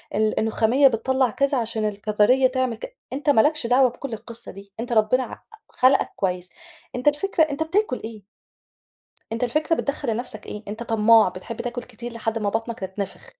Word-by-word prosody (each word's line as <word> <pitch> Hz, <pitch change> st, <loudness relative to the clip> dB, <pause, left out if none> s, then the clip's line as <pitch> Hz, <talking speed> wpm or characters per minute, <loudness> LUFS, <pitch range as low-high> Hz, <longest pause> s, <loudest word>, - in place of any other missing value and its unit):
ال 215 Hz, 0 st, +1 dB
النخامية 225 Hz, +5 st, +4 dB
بتطَلّع 260 Hz, +1 st, +1 dB
كذا 275 Hz, +3 st, 0 dB
عشان 225 Hz, -2 st, -1 dB
الكظرية 210 Hz, +5 st, +3 dB
تعمل 255 Hz, -2 st, -1 dB
ك -, -, -9 dB, 0.2 s
أنت 290 Hz, +2 st, -1 dB
ما 245 Hz, -6 st, +6 dB
لكش 295 Hz, -4 st, +1 dB
دعوة 250 Hz, +1 st, +5 dB
بكل 245 Hz, +1 st, -7 dB
القِصة 230 Hz, +1 st, -7 dB
دي 195 Hz, 0 st, -14 dB
أنت 240 Hz, +1 st, -4 dB
ربنا 225 Hz, +4 st, +3 dB
ع -, -, -9 dB, 0.3 s
خلَقَك 260 Hz, +2 st, +3 dB
كويس، 180 Hz, -2 st, -2 dB, 0.4 s
أنت 250 Hz, +3 st, -3 dB
الفكرة 320 Hz, +4 st, +3 dB
أنت 305 Hz, 0 st, -1 dB
بتآكل 355 Hz, -3 st, 0 dB
إيه؟ 220 Hz, -2 st, -8 dB, 1.1 s
أنت 230 Hz, +2 st, -1 dB
الفكرة 305 Hz, +6 st, +1 dB
بتدخّل 280 Hz, -4 st, -2 dB
لنَفْسَك 215 Hz, -2 st, -4 dB
إيه؟ 210 Hz, -, -7 dB
أنت 215 Hz, +3 st, -5 dB
طماع 225 Hz, -2 st, +5 dB
بتحب 185 Hz, +6 st, -8 dB
تآكل 245 Hz, 0 st, -4 dB
كتير 240 Hz, 0 st, -9 dB
لحدّ 225 Hz, -1 st, -2 dB
ما 210 Hz, -2 st, -1 dB
بطنَك 225 Hz, +2 st, -3 dB
تتنفخ. 190 Hz, +1 st, -6 dB
235 Hz, 175 wpm, -23 LUFS, 215-265 Hz, 1.1 s, ما